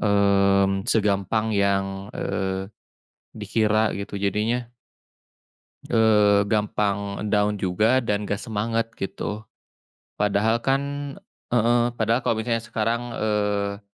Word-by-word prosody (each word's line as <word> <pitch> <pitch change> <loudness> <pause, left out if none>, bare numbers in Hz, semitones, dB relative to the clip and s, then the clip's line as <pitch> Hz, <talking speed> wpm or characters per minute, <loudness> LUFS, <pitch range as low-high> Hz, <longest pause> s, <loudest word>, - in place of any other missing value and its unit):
mmm, 100 -1 +3
segampang 105 0 +1
yang, 100 -1 +2 0.3
eee, 95 +1 -3 0.6
dikira 110 0 +1
gitu. 100 0 -6
Jadinya 110 +5 0 1.3
Eee, 105 -3 +4
gampang 100 -1 -1
down 105 0 +1
juga, 105 +8 +2
dan 105 -3 -1
enggak 100 0 -2
semangat 115 0 -2
gitu. 105 +2 -5 0.8
Padahal 105 +3 +2
kan 135 +3 +1 0.7
heeh, 120 0 +3 0.2
padahal 115 +2 +1
kalau 115 - +1
misalnya 115 -1 0
sekarang, 115 +1 -1
eee 105 -1 -1
105 Hz, 100 wpm, -24 LUFS, 100-110 Hz, 1.3 s, Eee